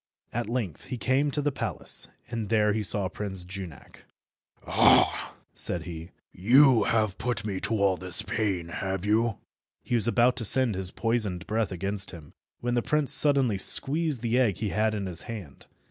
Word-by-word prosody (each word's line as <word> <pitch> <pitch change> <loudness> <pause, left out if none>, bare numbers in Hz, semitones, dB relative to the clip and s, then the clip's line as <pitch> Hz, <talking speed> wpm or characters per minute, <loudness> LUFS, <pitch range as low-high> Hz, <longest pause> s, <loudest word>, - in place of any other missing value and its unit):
At 120 -1 -3
length 115 - -4
he 130 - -6
came 130 +5 +1
to 145 +1 -2
the 145 - 0
palace, - - -2 0.2
and 115 -3 -4
there 105 -2 +2
he 110 - -1
saw 100 -1 +1
Prince 95 -2 -6
Junak. 90 -6 -10 0.6
"Ah!" - - +3 0.2
said 85 - +1
he, 85 -1 -8 0.2
"you 125 +5 +4
have 110 -4 0
put 125 -3 -2
me 100 -3 -3
to 115 - -1
all 100 -3 +1
this 90 +3 -4
pain, 100 -5 -2
have 95 +2 -4
you?" 110 +2 +1 0.5
He - - -5
was 115 -3 +4
about 120 +1 +2
to 120 - -1
send 125 +1 +5
his 95 -1 -2
poisoned 105 -5 -2
breath 110 -1 -2
against 100 +2 -1
him, 80 -5 -12 0.3
when 120 0 -2
the 120 - +1
prince 150 +2 +1
suddenly 135 -9 +4
squeezed 150 - +1
the 120 +2 +1
egg 110 -8 +1
he 110 - -3
had 110 +2 0
in 100 -2 -4
his 90 -3 -4
hand. 100 -12 -9
110 Hz, 180 wpm, -26 LUFS, 95-120 Hz, 0.6 s, send